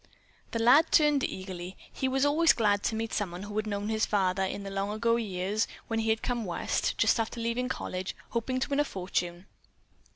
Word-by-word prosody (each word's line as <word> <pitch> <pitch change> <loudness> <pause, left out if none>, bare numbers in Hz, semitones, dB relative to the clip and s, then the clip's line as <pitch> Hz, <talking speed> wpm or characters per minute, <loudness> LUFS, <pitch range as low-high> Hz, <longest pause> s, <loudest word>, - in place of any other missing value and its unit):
The - - -3
lad 255 +8 +5
turned 295 -3 +4
eagerly. 185 -1 -5 0.2
He 265 - -1
was 265 +1 +2
always 315 +3 +5
glad 205 -3 +2
to 225 - 0
meet 225 0 -3
someone 180 -3 -2
who 205 0 -7
had 215 0 -1
known 205 0 -2
his 220 0 0
father 190 -2 +1
in 190 +1 -2
the 195 - -6
long 195 +1 -2
ago 230 +2 +1
years, 205 -1 -1 0.2
when 225 -1 0
he 225 0 0
had 220 0 +1
come 240 -2 -1
West, 175 -4 -1
just - - +3
after 225 +1 -2
leaving 235 +2 -1
college, 185 -6 -4
hoping 250 +2 -1
to - - -1
win 280 0 +1
a - - +5
fortune. 180 -5 -3
220 Hz, 205 wpm, -29 LUFS, 195-240 Hz, 0.2 s, lad